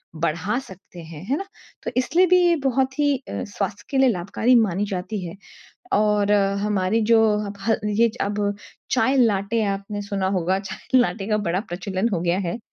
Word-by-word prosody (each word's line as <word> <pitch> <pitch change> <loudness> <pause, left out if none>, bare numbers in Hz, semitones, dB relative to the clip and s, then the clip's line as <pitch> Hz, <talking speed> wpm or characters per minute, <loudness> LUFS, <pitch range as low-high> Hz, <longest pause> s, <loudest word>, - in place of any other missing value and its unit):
बढ़ा 170 +6 -1
सकते 190 -7 -13
हैं। 160 -1 -10
है 270 +7 0
ना? 390 - -5 0.4
तो - - -3
इसलिए 315 +9 +3
भी 365 +1 +5
ये 345 -1 +4
बहुत 265 0 +1
ही 290 -1 +3
अ, 265 - -6
स्वास्थ्य 205 0 -4
के 275 - -1
लिए 265 -1 +5
लाभकारी 215 +5 +1
मानी 205 -4 +2
जाती 195 +2 -3
है। 170 - -7 0.6
और 210 -1 +2 0.3
हमारी 210 +1 +1
जो 225 - +6 0.2
अब 200 0 -7
ह 225 +3 +2 0.2
ये 230 +2 +3
अब 205 +1 -1 0.5
चाय 260 +1 +2
लाटे 220 -2 +2
आपने 200 +1 -3
सुना 200 -1 -2
होगा 185 +2 +1
चाय 195 +6 -1
लाटे 200 -4 0
का 215 - +2
बड़ा 180 +3 0
प्रचलन 190 +4 -2
हो 170 - 0
गया 175 +1 +1
है। 180 +2 -3
205 Hz, 185 wpm, -23 LUFS, 190-235 Hz, 0.6 s, जो